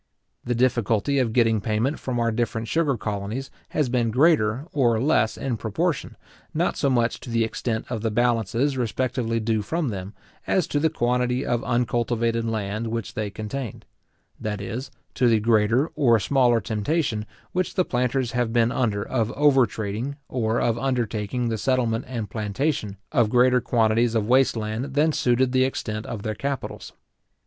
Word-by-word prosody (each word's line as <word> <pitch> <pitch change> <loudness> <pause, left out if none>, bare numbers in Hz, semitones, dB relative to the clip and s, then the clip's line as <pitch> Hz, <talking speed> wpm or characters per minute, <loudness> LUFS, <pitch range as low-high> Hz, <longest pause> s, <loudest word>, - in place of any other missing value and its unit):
The 120 - -1
difficulty 120 +2 +1
of 120 -4 +1
getting 115 -2 +3
payment 115 +8 0
from 125 -2 -2
our 115 0 +1
different 115 0 -2
sugar 150 -4 +1
colonies 105 +6 -4 0.2
has 150 -3 0
been 120 -2 +1
greater 130 -2 +3
or 120 -6 +3
less 120 -4 +2
in 125 -4 -2
proportion, 140 - -2 0.4
not - - +1
so 140 - +1
much 120 -2 +1
to - - -10
the 115 -1 +2
extent 110 0 -2
of 115 -3 -4
the 115 - 0
balances 120 +4 +1
respectively 120 0 -1
due 110 -1 0
from 155 +7 -1
them, 95 -1 -6 0.3
as 185 -4 +2
to 145 - +1
the 160 +2 +3
quantity 125 -2 0
of 120 +1 0
uncultivated 120 -1 0
land 110 0 -2
which 115 -2 -4
they 105 -1 -2
contained; 110 +3 -6 0.5
that 105 -2 -3
is, 120 +7 -5 0.2
to 125 - +2
the 115 -2 +4
greater 115 +6 +2
or 120 -5 +4
smaller 125 0 +3
temptation 110 - -1 0.2
which 185 0 -1
the 185 - +2
planters 125 0 0
have 120 -2 0
been 115 0 +3
under 110 -6 -1
of 115 0 0
over 140 -4 +4
trading, 110 +7 -4
or 115 -2 0
of 115 0 +1
undertaking 120 -2 -1
the 110 -1 -2
settlement 125 -2 0
and 115 -6 -5
plantation 110 -1 -2
of 120 -7 +3
greater 125 +1 +4
quantities 115 0 +2
of 110 -2 +1
waste 130 +1 +4
land 110 +5 -3
than 155 +2 +4
suited 125 -2 +2
the 130 0 +3
extent 110 -4 -3
of 105 -4 -5
their 110 - -2
capitals. 140 +3 -5
120 Hz, 170 wpm, -24 LUFS, 110-130 Hz, 0.5 s, the